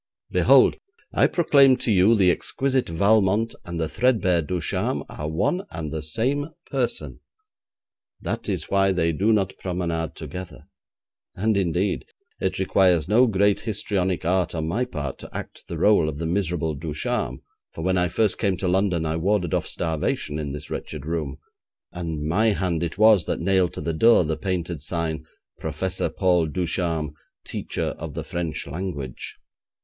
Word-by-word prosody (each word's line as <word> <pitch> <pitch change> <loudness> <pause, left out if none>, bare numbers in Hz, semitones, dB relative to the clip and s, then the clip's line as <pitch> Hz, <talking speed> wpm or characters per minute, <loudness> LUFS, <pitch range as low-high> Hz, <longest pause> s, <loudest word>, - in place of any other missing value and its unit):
Behold, - - +5 0.4
I - - +4
proclaim 140 -6 +5
to 115 - -1
you, 100 +3 +5
the 95 -4 +5
exquisite 130 +6 -1
Valmont 100 +5 +3
and 85 -1 -5
the 80 - 0
threadbare 105 -5 +2
Ducharme 85 +1 -1
are 75 +1 -5
one 95 - 0
and 80 -2 -5
the 80 - -3
same 130 - -1 0.2
person. - - -2 1.0
That - - -4
is - - -1
why 95 -1 +2
they 85 -2 +1
do 100 +8 +1
not 100 -3 +1
promenade 85 -3 -2
together. 90 -3 -8 0.7
And, 110 +3 +1
indeed, 95 0 0 0.3
it - - -1
requires 90 -5 +3
no 120 +6 +5
great 100 -1 +2
histrionic 95 -5 -1
art 90 -1 +1
on 80 -1 -2
my 115 +10 0
part 70 - -5
to - - -10
act - - -9
the - - -5
rôle 100 -7 +4
of 75 - -6
the 80 - -3
miserable 85 -2 -1
Ducharme, 75 -4 -3 0.3
for 80 - -7
when 95 0 +2
I 90 - +2
first 105 +4 0
came 100 -4 +1
to 95 - -2
London, 90 -2 +1
I 80 +1 -1
warded 90 0 0
off - - 0
starvation 80 -2 -2
in 75 -2 -3
this 75 0 -8
wretched 75 -3 -5
room, 75 -4 -3 0.5
and 80 -4 -4
my 105 +8 +2
hand 90 -5 -1
it 85 +1 -3
was 110 -5 +6
that - - -1
nailed 90 -1 +2
to - - -6
the 80 +2 -2
door 115 +4 +5
the 80 0 -1
painted 85 -2 -3
sign 80 0 -3 0.3
'Professor 85 +4 -2
Paul 90 -4 +2
Ducharme, 80 -2 -1 0.3
Teacher - - -3
of 80 -3 -6
the 80 - -3
French 80 -1 -3
Language'. 80 -8 -5
90 Hz, 165 wpm, -24 LUFS, 80-100 Hz, 1.0 s, was